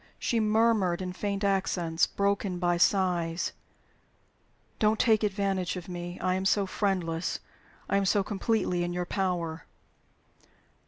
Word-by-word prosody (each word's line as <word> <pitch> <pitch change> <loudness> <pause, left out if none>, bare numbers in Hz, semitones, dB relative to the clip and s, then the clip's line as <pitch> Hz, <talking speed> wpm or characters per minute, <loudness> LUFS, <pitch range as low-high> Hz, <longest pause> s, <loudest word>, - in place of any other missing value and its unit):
She 235 - 0
murmured 215 -4 +2
in 185 -1 -4
faint 200 +1 -3
accents, 185 -4 +1
broken 200 -2 0
by 175 -1 +1
sighs, 175 -2 +1 1.3
"Don't 215 0 +2
take 220 -3 +4
advantage 195 -3 0
of 180 -2 -7
me. 175 0 -6
I 185 0 +1
am 190 +1 -1
so 195 +1 +3
friendless; 185 -4 -1 0.5
I - - +2
am 200 - +1
so 200 +1 +3
completely 200 -3 0
in 175 0 -2
your 180 0 -2
power." 175 -4 -2
190 Hz, 130 wpm, -28 LUFS, 175-200 Hz, 1.3 s, take